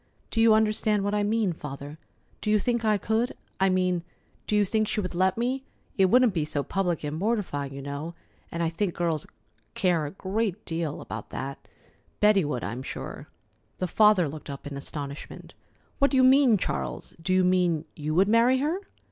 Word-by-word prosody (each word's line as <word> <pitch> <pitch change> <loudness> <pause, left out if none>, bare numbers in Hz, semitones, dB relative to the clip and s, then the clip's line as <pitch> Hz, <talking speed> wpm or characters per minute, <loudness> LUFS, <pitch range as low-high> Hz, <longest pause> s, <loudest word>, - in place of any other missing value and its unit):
Do 225 - +1
you 225 -1 +7
understand 215 -1 +2
what 205 +1 -1
I 210 - +2
mean, 210 -2 +1
Father? 145 0 -8 0.4
Do - - -2
you 215 - +5
think 235 +2 0
I 215 -1 +3
could? 220 +5 -1 0.2
I 190 0 +4
mean, 185 -1 +1 0.5
do 210 - +1
you 205 -1 +4
think 215 +2 +1
she - - -1
would 185 -3 -3
let 185 +3 +2
me? 255 +3 -1 0.3
It 190 - +4
wouldn't 245 +1 +5
be 165 -4 0
so 145 -1 -2
public 180 -3 -1
and 150 0 -3
mortifying, 175 -8 -1
you 135 0 -7
know, 145 +4 -5 0.4
and 170 0 -2
I 165 - +1
think 175 +2 -2
girls 165 -3 -1 0.5
care 175 -5 +1
a - - -7
great 200 +1 -2
deal 165 -3 -3
about - - -7
that. 135 +1 -6 0.5
Betty 210 -2 +5
would, 145 -5 -2
I'm 115 +5 -4
sure." - - -7 0.5
The 185 - -1
father 210 -3 +5
looked 150 +1 -8
up 140 -1 -7
in 145 -1 -6
astonishment. 140 0 -7 0.5
"What 280 -1 +4
do 270 - +1
you 260 - +6
mean, 260 -3 +6
Charles? - - -4
Do 185 - -2
you 185 0 +4
mean 180 -3 +2
you 155 +1 -3
would 190 +3 +5
marry 230 +4 +4
her?" 305 +7 0
185 Hz, 195 wpm, -27 LUFS, 155-215 Hz, 0.5 s, you